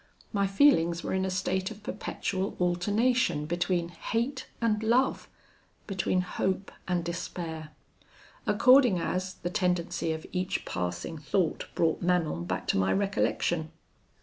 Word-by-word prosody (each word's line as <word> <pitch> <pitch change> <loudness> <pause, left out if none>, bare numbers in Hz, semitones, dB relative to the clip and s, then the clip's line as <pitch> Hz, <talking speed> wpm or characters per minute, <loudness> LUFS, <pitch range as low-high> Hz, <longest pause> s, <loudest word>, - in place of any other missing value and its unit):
My 200 -1 +2
feelings 190 - +4
were - - -2
in 190 0 +1
a - - -1
state 190 0 -1
of 215 -1 -11
perpetual 190 -1 -3
alternation 180 -1 +2
between 175 +1 0
hate 235 - -2
and 220 -2 +1
love; 235 +4 +2 0.6
between 185 -1 0
hope 190 +1 -2 0.2
and 180 -2 0
despair; 170 -2 -5 0.8
according 245 -1 +6
as, 185 +2 -2
the 175 - -4
tendency 180 -3 0
of 160 0 -4
each 180 0 -2
passing 90 - -3
thought 160 +3 0
brought 165 -1 +1
Manon 170 - +1
back - - -3
to - - +3
my 95 0 +2
recollection. 175 -5 0
180 Hz, 130 wpm, -29 LUFS, 170-200 Hz, 0.8 s, according